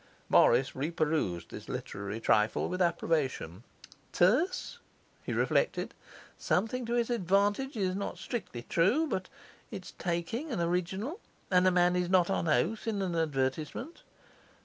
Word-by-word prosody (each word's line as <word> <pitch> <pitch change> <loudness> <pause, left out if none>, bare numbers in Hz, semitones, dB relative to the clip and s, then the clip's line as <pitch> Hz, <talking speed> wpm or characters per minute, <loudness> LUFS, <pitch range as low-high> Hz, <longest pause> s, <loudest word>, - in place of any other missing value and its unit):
Morris 130 +3 +5
reperused 150 - -1
this - - -9
literary 100 +2 -5
trifle 105 -1 +2
with 185 +1 -3
approbation. 145 - 0 0.5
'Terse,' 280 - +2 0.4
he - - -4
reflected. - - +1 0.5
'Something 225 +6 0
to 235 - 0
his 240 0 +1
advantage 205 +5 +1
is 185 -3 0
not 200 - -4
strictly 170 - -5
true; 210 - +2
but 190 -11 -3 0.4
it's 185 - -8
taking 180 - -2
and 230 - -2
original, 180 - -1 0.3
and 180 0 +5
a - - +5
man 180 0 +3
is 180 -1 0
not 180 -2 +4
on 165 - 0
oath 170 - +1
in 215 -3 0
an 180 -3 -2
advertisement. 150 - -2
180 Hz, 135 wpm, -30 LUFS, 155-220 Hz, 0.5 s, Morris